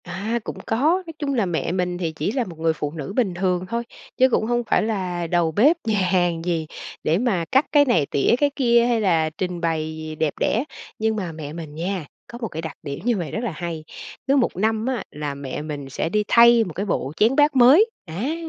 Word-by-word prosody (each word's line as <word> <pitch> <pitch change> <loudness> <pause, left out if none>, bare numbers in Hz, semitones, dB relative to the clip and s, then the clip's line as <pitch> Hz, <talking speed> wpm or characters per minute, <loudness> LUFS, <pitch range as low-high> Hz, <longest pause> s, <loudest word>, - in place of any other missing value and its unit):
À, 220 +5 -3
cũng - - -6
có. 225 - 0 0.3
Nói 325 - -8
chung 285 -2 -1
là 230 -6 +1
mẹ 170 -2 -2
mình 180 -1 -1
thì 170 -3 -2
chỉ 160 +5 -2
là 255 +1 0
một 170 -7 -10
người 160 0 +2
phụ 150 -2 -4
nữ 155 +2 -6
bình 215 -8 +1
thường 180 0 0
thôi, 235 +2 -1 0.3
chứ 260 +1 +5
cũng 220 - +1
hông 240 +1 0
phải 225 - +2
là 185 -6 -2
đầu 170 -1 +1
bếp 280 - +4
nhà 215 -2 +2
hàng 175 -3 +1
gì 165 -3 -1 0.4
để 160 - +2
mà 200 -7 0
cắt 265 +3 +4
cái 290 -1 +6
này, 170 - +2
tỉa 140 +11 +2
cái 290 +2 +2
kia 235 -3 +4
hay 240 -2 +1
là 165 -6 +2
trình 175 +2 -4
bày 160 -2 -1
gì 155 0 -6
đẹp 155 -1 0
đẽ. 225 - +1 0.4
Nhưng 220 0 +1
mà 185 -5 -3
mẹ 155 -2 -7
mình 155 -3 -8
nha, 175 +1 -3 0.2
có 240 -1 -9
một 225 - -1
cái 160 -4 -6
đặc 160 -3 -7
điểm 140 -1 -5
như 240 -3 +2
vậy 170 -4 -4
rất 220 - -3
là 235 - -1
hay, 165 -1 -5 0.4
cứ 275 - +4
1 260 -4 +2
năm 220 +3 0
á, 255 -5 -1
là 150 -1 -4
mẹ 140 0 -5
mình 145 -3 -6
sẽ 135 - -2
đi 210 +4 +1
thay 235 0 +6
một 175 - -6
cái 195 +5 -3
bộ 140 -8 -2
chén 225 +5 +3
bát 295 0 +4
mới 275 - +7 0.2
á. 205 - -3
185 Hz, 245 wpm, -22 LUFS, 160-235 Hz, 0.4 s, mới